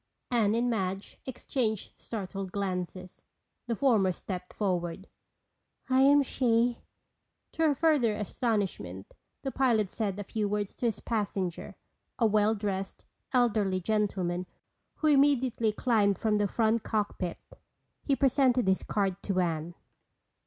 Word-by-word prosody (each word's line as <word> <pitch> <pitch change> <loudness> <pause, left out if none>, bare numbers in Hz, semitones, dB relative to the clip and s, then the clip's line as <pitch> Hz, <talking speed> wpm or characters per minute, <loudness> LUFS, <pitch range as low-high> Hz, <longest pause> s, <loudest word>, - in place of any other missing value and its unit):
Anne 220 -3 +3
and 240 +1 +1
Madge 195 -4 -2
exchanged 235 -4 -2
startled 195 -3 -5
glances. 185 -2 -4 0.4
The 235 - 0
former 215 -7 +3
stepped 180 0 -6
forward. 180 -2 -2 0.8
"I 260 +1 +5
am 285 +1 +6
she." 240 -2 +1 0.7
To - - -5
her 290 - +2
further 280 -9 +3
astonishment, 200 - -2 0.3
the 270 - -2
pilot 230 -8 +2
said 205 -4 -2
a 205 - -4
few 210 0 -2
words 205 -1 -2
to 240 - 0
his 220 -3 -2
passenger, 200 -6 -3 0.4
a 235 - +3
well 215 0 +3
dressed, 195 -2 -4 0.3
elderly 215 -7 +2
gentleman, 185 -3 -1 0.5
who - - -4
immediately 265 -6 +3
climbed 210 -4 +2
from 215 +1 +1
the 205 -1 +2
front 225 +2 +1
cockpit. 205 -5 -2 0.6
He 275 - +1
presented 260 -4 +3
his 190 0 +3
card 195 -2 -1
to 195 -2 -1
Anne. 170 -1 -1
210 Hz, 130 wpm, -29 LUFS, 190-240 Hz, 0.8 s, am